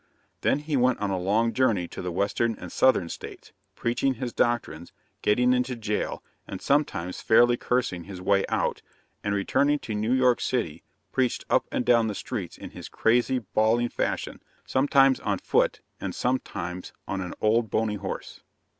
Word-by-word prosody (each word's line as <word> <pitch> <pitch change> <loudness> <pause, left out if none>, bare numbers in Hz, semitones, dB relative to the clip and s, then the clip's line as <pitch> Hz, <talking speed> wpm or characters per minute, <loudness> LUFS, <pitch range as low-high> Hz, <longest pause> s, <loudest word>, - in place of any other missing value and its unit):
Then - - +2
he 150 0 -2
went 125 -1 +3
on 100 -1 -2
a 95 - -1
long 110 +5 +1
journey 105 -8 +2
to - - -7
the 90 - -3
Western 100 +5 0
and - - -8
Southern 130 -10 +3
States, - - -9 0.2
preaching 130 +3 0
his 120 0 -4
doctrines, 120 -9 -1 0.3
getting 125 +4 +3
into 125 0 0
jail, 105 -2 -3 0.2
and - - -6
sometimes 95 - 0
fairly 120 +2 +5
cursing 120 -9 -1
his 95 -2 -8
way 100 +1 +2
out; - - 0 0.4
and, 100 0 0
returning 140 +8 +2
to 115 -6 -6
New 105 +3 -1
York 125 -2 +3
city, 115 -12 -1 0.3
preached 130 -2 0
up - - +3
and 125 - -1
down 115 -2 +4
the 105 - -3
streets 100 -8 -5
in - - -9
his - - -9
crazy, 120 +3 +2 0.2
bawling 115 +2 +3
fashion, - - -3 0.2
sometimes 135 0 +4
on - - -1
foot - - +1 0.2
and - - -4
sometimes 90 -8 -3
on 95 - -2
an 90 - -5
old 110 +1 +2
bony 110 0 0
horse. 95 -1 -6
115 Hz, 170 wpm, -26 LUFS, 100-125 Hz, 0.4 s, fairly